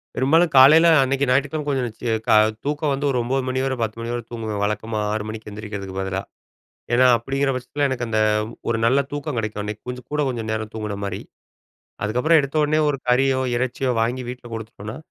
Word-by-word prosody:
பெரும்பாலும் 160 +6 +3
காலையில 155 +6 +8 0.2
அன்னக்கி 135 +1 +1
ஞயிற்றுக்கிழமை 145 +3 +1
கொஞ்சம் 130 -4 0 0.4
க - - -2 0.4
தூக்கம் 145 0 0
வந்து 140 +1 -2
ஒரு 130 - 0
9:00 130 +2 -1
மணி 130 0 -1
வரை 135 - -1
10:00 110 0 -2
மணி 115 +1 -4
வரை 120 -1 -3
தூங்குவேன். 110 -3 -4
வழக்கமா 105 +1 -2
6:00 110 -1 -2
மணிக்கு 110 -1 -7
எந்திரிக்கிறதுக்கு 100 -2 -7
பதிலா, 95 0 -2 0.7
ஏனா 130 +1 +5
அப்பிடிங்கிற 135 +4 -1
பட்சத்தில 130 +3 -2
எனக்கு 125 -3 -2
அந்த 110 -1 0 0.5
ஒரு 115 - 0
நல்ல 130 +4 +4
தூக்கம் 145 -2 -4
கிடைக்கும், 105 -1 -3
அன்னக்கி 105 +1 -6
கொஞ்சம் 125 0 -7
கூட 150 - 0
கொஞ்சம் 115 -3 -4
நேரம் 110 -1 -4
தூங்குனமாரி. 100 -3 -4 0.8
அதுக்கப்புறம் 125 +10 +3
எடுத்த 140 +2 -6
உடனே 155 +1 +2
ஒரு 140 -2 -2
கறியோ! 130 +1 +3
இறைச்சியோ! 130 +1 -1
வாங்கி 120 +3 -1
வீட்ல 125 0 -8
கொடுத்துட்டோன்னா, 110 0 -7
125 Hz, 180 wpm, -22 LUFS, 110-135 Hz, 0.8 s, காலையில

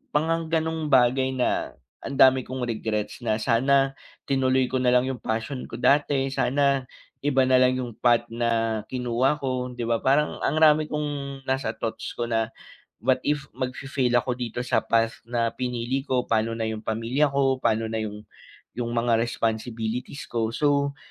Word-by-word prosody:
parang 165 +2 +1
gano'ng 160 -1 -1
bagay 130 0 +3
na, 125 - -1 0.3
ang 140 - -5
dami 130 -1 +6
kong 130 0 -4
regrets, 110 -1 -3
na 115 -3 0
sana 135 +4 +3 0.4
tinuloy 130 -1 +2
ko 130 - +1
nalang 125 +1 +3
yung 130 - -6
passion 115 +4 -3
ko - - -8
dati, 135 +1 +2
sana 135 -1 +1 0.3
iba 135 -2 +2
nalang 130 0 +4
yung 125 -2 -4
path 120 -1 +4
na 115 -2 0
kinuha 125 +3 0
ko 130 -2 -2
'di 120 - -2
ba, 115 -1 0
parang 140 +3 +1
ang 155 - 0
rami 155 -1 +5
kong 145 -2 -4
nasa 135 0 -1
thoughts 115 -1 -4
ko 120 - -1
na 115 -1 0 0.5
what 130 +2 +3
if 145 -2 -1
magfi-fail 130 0 -2
ako 120 +1 +1
dito 120 -1 -4
sa 125 - 0
path 115 0 +1
na 115 -1 0
pinili 125 +2 -3
ko, 130 -3 0
pa'no 115 0 +1
na 115 -1 -2
yung 110 0 -6
pamilya 115 +6 +1
ko, 135 -1 +2
pa'no 115 -2 0
na 110 - -2
yung 105 0 -7 0.5
yung 120 -1 -3
mga 115 -1 +2
responsibilities 115 +3 -3
ko? 115 -2 -1
So, 140 -1 +1
125 Hz, 165 wpm, -25 LUFS, 115-135 Hz, 0.5 s, dami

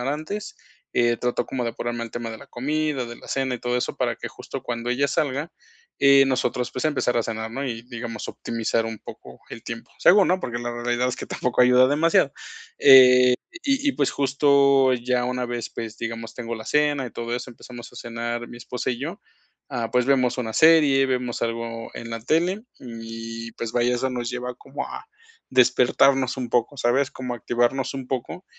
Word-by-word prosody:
hora 135 +4 -1
antes, 205 +8 -6 0.4
eh, 120 0 +3
trato 125 0 -1
como 130 -2 -3
de 115 -1 -3
ponerme 120 0 -3
al 115 - -6
tema 115 0 -5
de 110 - -8
la - - -13
comida, 150 +1 -1
de 120 0 -8
la - - -14
cena 135 -1 -1
y - - -5
todo 120 +1 -1
eso, 125 - -2
para - - -1
que - - -6
justo - - -8
cuando 120 0 -4
ella 130 +3 +2
salga, 140 +3 -1 0.5
eh, 140 0 +7
nosotros, 125 -1 0
pues, 130 - -4
empezar 130 -5 0
a - - +1
cenar, 110 0 -4
¿no? 135 +4 -4
Y, 115 -2 -4
digamos, 115 -2 -6
optimizar 115 0 -2
un 110 -1 -6
poco - - -12
el 115 - -8
tiempo, 115 0 -7
según, 195 +1 +6
¿no? 185 +1 +2
Porque 120 -7 -4
la 120 0 -4
realidad 120 +1 0
es 125 - -3
que - - -7
tampoco 125 0 -1
ayuda 125 +1 +6
demasiado. 145 -1 +3 0.5
Eh, 125 -2 +8 0.3
y 280 0 +1
y - - -8
pues 140 - +1
justo 140 -1 +4
ya 125 0 0
una 125 0 -2
vez, 120 -1 -4
pues, 110 -1 -7
digamos, 115 0 -5
tengo 115 -1 -5
la 110 -1 -8
cena 150 -1 +1
y - - -8
todo 120 +1 -4
eso, 125 +1 -7
empezamos 120 0 -11
a - - -14
cenar 120 0 -4
mi 120 - -10
esposa 125 +2 -4
y 120 - -3
yo, 165 +9 -5 0.5
ah, 120 -4 -3
pues 125 0 +2
vemos 130 -2 +2
una 115 -3 -3
serie, 150 -2 +5
vemos 125 -2 -2
algo 115 0 -3
en 115 - -7
la 115 0 -4
tele, 175 - 0
y 115 -1 -7
pues 115 0 -5
vaya, 120 0 +2
eso 130 +2 -1
nos 120 -2 -3
lleva 125 0 -4
como 135 +3 -6
a 425 +1 -8 0.5
despertarnos 130 +1 +4
un 125 -2 -3
poco, 120 +4 0
¿sabes?, 130 +3 +2
como 125 -1 -5
a - - -6
activarnos 120 +4 0
un 135 -2 -5
poco. 130 +8 -4
125 Hz, 205 wpm, -24 LUFS, 120-135 Hz, 0.5 s, Eh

